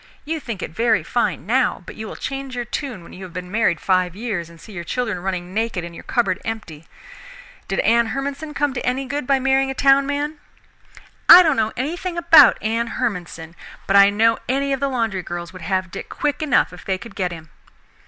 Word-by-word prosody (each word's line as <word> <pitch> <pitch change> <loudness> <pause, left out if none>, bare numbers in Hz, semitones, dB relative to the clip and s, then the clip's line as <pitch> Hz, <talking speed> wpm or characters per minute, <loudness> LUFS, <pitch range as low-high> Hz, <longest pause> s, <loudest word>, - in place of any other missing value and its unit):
You 320 +2 -2
think 230 -9 -6
it - - -5
very 225 +5 +1
fine 205 -10 -1
now, 245 -3 +1
but - - -9
you 220 0 -7
will - - -8
change 270 -1 -5
your 245 -1 -3
tune 240 - -5
when - - -14
you 190 - -10
have 180 -2 -10
been 180 0 -7
married 215 -6 +1
five 185 -2 +1
years 200 -7 -4
and 170 -1 -16
see 215 - -13
your 175 -2 -5
children 220 0 -2
running 180 -1 -4
naked 220 -4 -1
and 170 0 -8
your - - -10
cupboard 200 -7 0
empty. 180 -9 -6 0.8
Did 195 - 0
Anne 235 +1 +3
Hermanson 280 +5 -4
come 290 -1 0
to 250 - -4
any 255 +2 -1
good 285 +3 -3
end 250 - -8
by 275 - +4
marrying 270 +1 +2
a 270 - -4
town 275 0 +4
man?" 295 +1 -2 0.9
"I 360 +1 +12
don't 310 -4 +2
know 220 -2 0
anything 340 +7 -3
about 330 -4 +7
Anne 230 +2 0
Hermanson, 175 -6 -4 0.3
but 195 - +1
I 200 0 +8
know 225 +3 +2
any 275 +1 +1
of 270 - -2
the 280 +1 0
laundry 225 -7 -1
girls 175 0 -6
would 185 - -10
have 185 +1 -2
Dick - - -7
quick 295 0 -2
enough 290 -10 +2
if 180 - -11
they 190 -1 -1
could 230 +5 -11
get 185 -4 -2
him." 160 -3 -10
225 Hz, 220 wpm, -21 LUFS, 185-270 Hz, 0.9 s, I